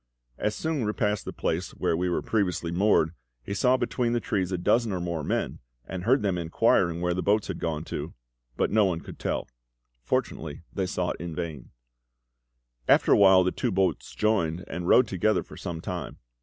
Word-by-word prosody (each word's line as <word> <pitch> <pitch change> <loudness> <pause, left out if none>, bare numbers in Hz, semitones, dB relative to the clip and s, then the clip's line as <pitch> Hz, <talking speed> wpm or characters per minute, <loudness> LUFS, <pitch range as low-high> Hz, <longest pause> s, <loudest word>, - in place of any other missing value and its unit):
As 105 0 0
Sung 160 -3 -1
repassed 105 -1 -1
the - - -4
place 85 +3 -2
where - - 0
we 90 +2 0
were 85 - -1
previously 90 -6 0
moored, 90 -3 +3 0.3
he 100 - -4
saw 125 +6 +3
between 120 -2 0
the 120 - +2
trees 95 -4 -1
a 90 - 0
dozen 115 +6 +2
or 95 - -2
more 85 -3 -3
men, - - -2 0.3
and 90 -1 -6
heard 130 +1 +3
them 95 -3 0
inquiring 85 0 +2
where 90 0 +1
the 90 - -1
boats 105 +2 +1
had - - -4
gone 80 -2 -2
to; - - -5 0.4
but - - +1
no 110 0 +4
one 90 -4 0
could - - -11
tell. - - -2 0.5
Fortunately 70 +5 -2
they 95 -2 -1
sought 90 -1 -2
in 85 -2 -5
vain. 80 -7 -5 1.2
After - - +5
a - - +8
while 95 -2 +7
the 90 - +1
two - - -1
boats 95 0 0
joined, 90 -6 +1
and 90 0 -5
rowed 125 +4 +6
together 100 +3 +1
for - - -13
some 85 -3 -5
time. 90 -1 -5
90 Hz, 195 wpm, -27 LUFS, 85-105 Hz, 1.2 s, a